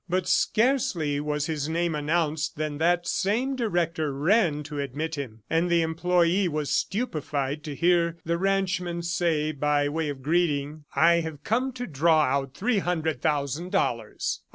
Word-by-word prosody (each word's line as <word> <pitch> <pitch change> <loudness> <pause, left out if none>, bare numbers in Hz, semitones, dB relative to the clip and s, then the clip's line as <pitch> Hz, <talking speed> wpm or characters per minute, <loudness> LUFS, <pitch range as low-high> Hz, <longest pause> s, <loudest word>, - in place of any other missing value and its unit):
But 180 +1 0
scarcely 210 - +1
was 150 0 -1
his 150 -2 -2
name 170 +1 0
announced 155 0 -1
than 150 -1 -3
that 175 +1 +2
same 235 +11 0
director 170 - 0
ran 150 +1 +2
to 150 0 -6
admit 145 +4 -3
him, 120 -8 -6
and 165 +2 +1
the 170 -1 +3
employee 175 +3 +2
was 150 -3 -2
stupefied 150 - -2
to 150 -2 -5
hear 170 +1 +2
the 170 +1 0
ranchman 185 -3 0
say, 165 -3 0
by 145 0 +1
way 155 0 -2
of 135 -2 -6
greeting, 150 -2 0
"I 170 +4 +5
have 160 -3 -6
come 250 +5 0
to 245 0 -5
draw 160 - +3
out 135 0 -1
three 225 0 +1
hundred 160 -7 -1
thousand 145 +4 -1
dollars. 120 -11 -1
160 Hz, 155 wpm, -26 LUFS, 150-175 Hz, -, I